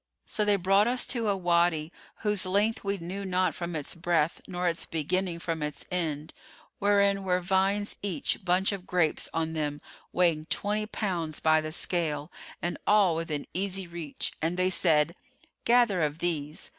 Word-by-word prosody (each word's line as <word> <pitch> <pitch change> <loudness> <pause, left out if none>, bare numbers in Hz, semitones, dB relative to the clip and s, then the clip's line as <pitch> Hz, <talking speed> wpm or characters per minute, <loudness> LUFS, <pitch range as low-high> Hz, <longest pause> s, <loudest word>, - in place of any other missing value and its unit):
So 215 - 0
they 205 -1 +4
brought 195 +3 +3
us 250 +1 +1
to 230 -4 -1
a 200 - +1
Wady, 170 -3 +2 0.3
whose 210 -3 +2
length 205 +4 +1
we 200 0 -1
knew 185 +3 -5
not 185 -1 +1
from 170 -1 -4
its 150 -3 -3
breadth 170 -2 0
nor 180 0 -2
its 165 -1 -1
beginning 170 +3 -1
from 165 -1 -3
its 150 -1 -4
end 160 -4 -2 0.5
wherein 200 -1 +3
were 180 -1 +1
vines 195 +3 +1
each 200 -1 -2
bunch 185 +2 +2
of 195 -2 -6
grapes 175 -4 +1
on 160 0 -1
them 150 -2 -2 0.3
weighing 165 -3 +2
twenty 210 +1 0
pounds[FN#438] 175 -8 -3
by 155 0 +5
the 155 0 -5
scale 155 -2 -1 0.3
and 175 - -2
all 200 -5 +5
within 160 -3 -3
easy 190 0 -1
reach, 170 -4 -4
and 165 +3 0
they 185 0 +2
said, 160 -3 +3 0.5
'Gather 235 -6 +4
of 150 -1 0
these. 155 -3 -3
180 Hz, 170 wpm, -28 LUFS, 160-195 Hz, 0.5 s, by